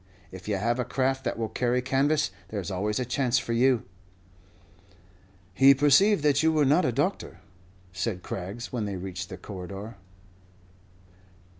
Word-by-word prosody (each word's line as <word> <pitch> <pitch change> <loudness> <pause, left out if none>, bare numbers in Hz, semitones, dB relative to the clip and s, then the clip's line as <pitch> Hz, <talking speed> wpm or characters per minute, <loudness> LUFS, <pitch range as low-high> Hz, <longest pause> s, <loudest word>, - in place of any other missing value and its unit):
If 95 +1 -11
you 105 - 0
have 120 +5 0
a - - +1
craft 135 +2 -1
that - - -2
will 115 -1 -2
carry 125 +2 0
canvas, 135 -2 +1 0.2
there's 100 -4 -5
always 105 +4 -1
a 125 - -1
chance 125 +1 +1
for 120 -1 -2
you." 125 0 +3 1.7
"He 135 +6 +6
perceived 150 +7 +4
that 145 -1 +3
you 160 0 +3
were 155 -2 +2
not 150 +7 +3
a 125 - +1
doctor," 145 - -2 0.5
said 90 0 -3
Craggs, 100 +7 -6
when 115 -4 -2
they 100 -1 -4
reached 90 0 -6
the 95 - -7
corridor. 100 +3 -8
120 Hz, 155 wpm, -27 LUFS, 100-135 Hz, 1.7 s, He